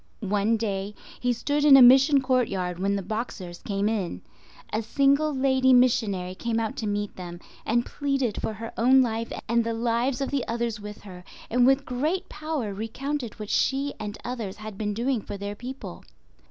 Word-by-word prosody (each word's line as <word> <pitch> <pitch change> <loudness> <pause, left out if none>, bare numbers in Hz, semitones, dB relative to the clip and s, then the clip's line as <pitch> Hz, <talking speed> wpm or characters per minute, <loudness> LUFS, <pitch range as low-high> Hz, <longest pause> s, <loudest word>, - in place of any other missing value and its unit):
One 210 +3 +2
day 205 -2 -3 0.2
he 250 - +1
stood 285 +5 -1
in 285 -2 +9
a - - +8
mission 270 +3 +7
courtyard 195 -9 0
when 200 +1 +1
the 200 - -2
Boxers 190 -5 -5
came 200 0 -1
in. 195 - -2 0.5
A 215 - +1
single 280 +6 +2
lady 265 -1 +3
missionary 215 -7 +2
came 230 +4 -2
out 225 -1 -2
to 220 - -3
meet 205 0 -2
them, 175 -1 -8 0.3
and 240 +2 +2
pleaded 275 -6 -1
for 220 - -2
her 225 +1 -7
own 260 +3 +6
life 230 -1 -3 0.2
and 235 +1 +2
the 230 0 -2
lives 235 +3 0
of 275 - -2
the 280 -3 0
others 230 -1 -2
with 210 0 -9
her, 180 -3 -11 0.3
and 245 +1 +4
with 270 +1 +3
great 310 +10 -1
power 305 -9 -3
recounted 235 +4 -4
what 210 -1 -5
she 275 +1 +1
and 210 +1 -5
others 230 -6 -4
had 215 -1 -8
been 210 0 -3
doing 240 +1 0
for 200 - -7
their 200 +1 -5
people. 255 +5 -8
230 Hz, 185 wpm, -26 LUFS, 205-265 Hz, 0.5 s, in